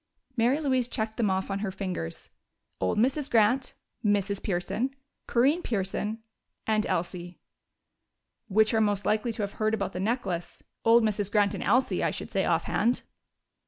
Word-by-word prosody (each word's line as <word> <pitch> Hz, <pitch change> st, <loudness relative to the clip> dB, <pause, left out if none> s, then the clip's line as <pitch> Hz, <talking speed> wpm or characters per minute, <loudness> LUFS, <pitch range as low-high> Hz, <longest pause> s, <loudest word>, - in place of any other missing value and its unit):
Mary 250 Hz, +4 st, +3 dB
Louise 260 Hz, -5 st, +1 dB
checked 220 Hz, -2 st, -3 dB
them 220 Hz, -4 st, +2 dB
off 190 Hz, +1 st, -1 dB
on 195 Hz, -, -1 dB
her 205 Hz, -1 st, -2 dB
fingers. 185 Hz, -, -5 dB, 0.5 s
"Old 95 Hz, -, 0 dB
Mrs. 265 Hz, +5 st, +1 dB
Grant, 235 Hz, +4 st, +3 dB, 0.3 s
Mrs. 200 Hz, -1 st, +1 dB
Pearson, 210 Hz, +8 st, -1 dB, 0.3 s
Corinne 275 Hz, +8 st, +3 dB
Pearson 215 Hz, -, -2 dB, 0.4 s
and 215 Hz, -1 st, +1 dB
Elsie." 175 Hz, 0 st, -3 dB, 1.1 s
"Which 215 Hz, +2 st, +3 dB
are 220 Hz, -, +3 dB
most 205 Hz, -2 st, +1 dB
likely 220 Hz, +2 st, +1 dB
to 215 Hz, -, -2 dB
have 200 Hz, -, -3 dB
heard 215 Hz, +1 st, +3 dB
about 195 Hz, -2 st, -3 dB
the 180 Hz, -, -4 dB
necklace? 190 Hz, -5 st, -2 dB, 0.2 s
Old 230 Hz, +1 st, +6 dB
Mrs. 205 Hz, -2 st, 0 dB
Grant 205 Hz, -1 st, +3 dB
and 195 Hz, -, -4 dB
Elsie, 255 Hz, +1 st, +2 dB
I -, -, +3 dB
should -, -, -6 dB
say, -, -, +1 dB
offhand." 235 Hz, +4 st, +1 dB
215 Hz, 160 wpm, -28 LUFS, 195-235 Hz, 1.1 s, Old